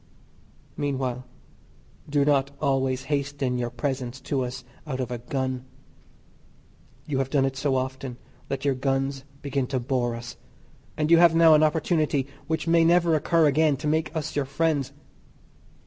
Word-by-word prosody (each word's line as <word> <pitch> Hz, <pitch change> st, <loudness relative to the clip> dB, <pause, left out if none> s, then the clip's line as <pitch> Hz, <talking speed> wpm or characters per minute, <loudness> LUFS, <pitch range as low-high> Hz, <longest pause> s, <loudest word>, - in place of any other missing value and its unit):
Meanwhile 130 Hz, -3 st, -2 dB, 0.8 s
do 145 Hz, -1 st, +2 dB
not 140 Hz, -2 st, +2 dB
always 135 Hz, -2 st, 0 dB
hasten 140 Hz, -3 st, -1 dB
your 120 Hz, -1 st, -1 dB
presents 130 Hz, 0 st, -3 dB
to 135 Hz, -1 st, -1 dB
us 125 Hz, +1 st, -6 dB, 0.2 s
out 130 Hz, -3 st, -3 dB
of 125 Hz, -1 st, -3 dB
a 120 Hz, -, -3 dB
gun. 130 Hz, +1 st, -3 dB, 1.4 s
You 140 Hz, -3 st, -1 dB
have 135 Hz, -1 st, -1 dB
done 135 Hz, -1 st, +2 dB
it 135 Hz, 0 st, -2 dB
so 135 Hz, 0 st, 0 dB
often 130 Hz, -1 st, -3 dB, 0.3 s
that 135 Hz, +1 st, -4 dB
your 140 Hz, -, +3 dB
guns 135 Hz, +1 st, -1 dB, 0.2 s
begin 140 Hz, -2 st, -1 dB
to 130 Hz, 0 st, -1 dB
bore 120 Hz, -1 st, -1 dB
us, 120 Hz, +1 st, -8 dB, 0.6 s
and 155 Hz, +1 st, 0 dB
you 170 Hz, -, +8 dB
have 170 Hz, -1 st, +6 dB
now 165 Hz, -1 st, +7 dB
an 155 Hz, -, +6 dB
opportunity 155 Hz, -2 st, +1 dB, 0.2 s
which 160 Hz, 0 st, -1 dB
may 165 Hz, 0 st, +5 dB
never 170 Hz, 0 st, +4 dB
occur 160 Hz, +1 st, +3 dB
again 150 Hz, 0 st, +3 dB
to 155 Hz, -, -7 dB
make 160 Hz, +1 st, 0 dB
us 155 Hz, -2 st, -3 dB
your 145 Hz, -2 st, 0 dB
friends. 145 Hz, -1 st, 0 dB
135 Hz, 160 wpm, -25 LUFS, 130-150 Hz, 1.4 s, you